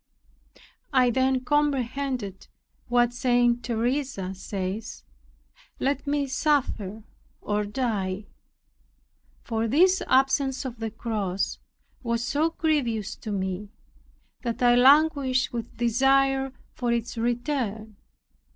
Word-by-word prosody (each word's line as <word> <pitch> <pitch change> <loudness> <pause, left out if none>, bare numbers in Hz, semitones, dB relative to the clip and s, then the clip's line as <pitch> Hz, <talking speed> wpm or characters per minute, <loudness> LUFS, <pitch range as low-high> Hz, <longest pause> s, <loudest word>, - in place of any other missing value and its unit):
I 250 -2 +4
then 260 +1 +2
comprehended 265 -7 -1 0.4
what 240 -1 +3
St. 245 -1 +2
Teresa 240 -4 -1
says, 195 +2 -5 0.8
"Let 280 +1 -1
me 285 0 +1
suffer 250 - 0 0.4
or 210 0 -1
die." 205 -4 -2 1.2
For 225 -1 -1
this 365 - +4
absence 265 0 +2
of 245 -3 -6
the 225 -1 -2
cross 205 -4 -2 0.4
was 235 -1 -1
so 300 +6 +1
grievous 270 -11 -1
to 215 - -6
me, 190 0 -3 0.7
that 235 0 -3
I 240 0 +6
languished 270 0 +4
with 235 -1 -5
desire 270 +3 +2 0.2
for 245 -1 -1
its 235 +1 -2
return. 235 -3 -2
245 Hz, 100 wpm, -26 LUFS, 220-270 Hz, 1.2 s, I